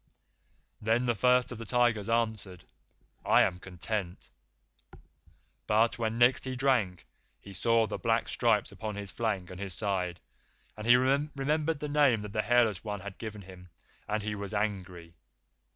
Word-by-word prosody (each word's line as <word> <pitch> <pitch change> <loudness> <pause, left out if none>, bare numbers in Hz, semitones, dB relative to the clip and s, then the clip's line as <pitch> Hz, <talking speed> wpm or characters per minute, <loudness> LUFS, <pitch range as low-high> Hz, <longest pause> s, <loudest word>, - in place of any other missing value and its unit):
"Then 115 +3 +1
the 120 - +2
First 125 +3 +3
of 120 - -7
the 115 - -6
Tigers 120 -2 +1
answered, 110 -6 -1 0.6
'I - - +5
am 90 -1 -1
content'; 95 0 -5 1.4
but 110 +2 +2
when 115 0 -1
next 120 +2 +4
he 130 0 -3
drank 125 -9 +1 0.3
he 100 - -12
saw 115 +3 +2
the - - -5
black - - +1
stripes - - +1
upon 110 -2 -6
his 100 -2 -6
flank 105 -6 -2
and 90 - -9
his 100 -3 -3
side, 90 -4 -2 0.6
and 105 +2 -7
he 120 - +8
remembered 145 +4 +1
the 150 - -2
name 145 -6 +3
that 105 -1 -8
the 110 - +1
Hairless 115 -5 +2
One 105 -3 -4
had 100 0 -9
given 105 -3 -7
him, 90 -1 -13 0.4
and 105 0 -1
he 105 0 -2
was 100 0 -5
angry. 95 -5 -3
110 Hz, 160 wpm, -30 LUFS, 100-120 Hz, 1.4 s, he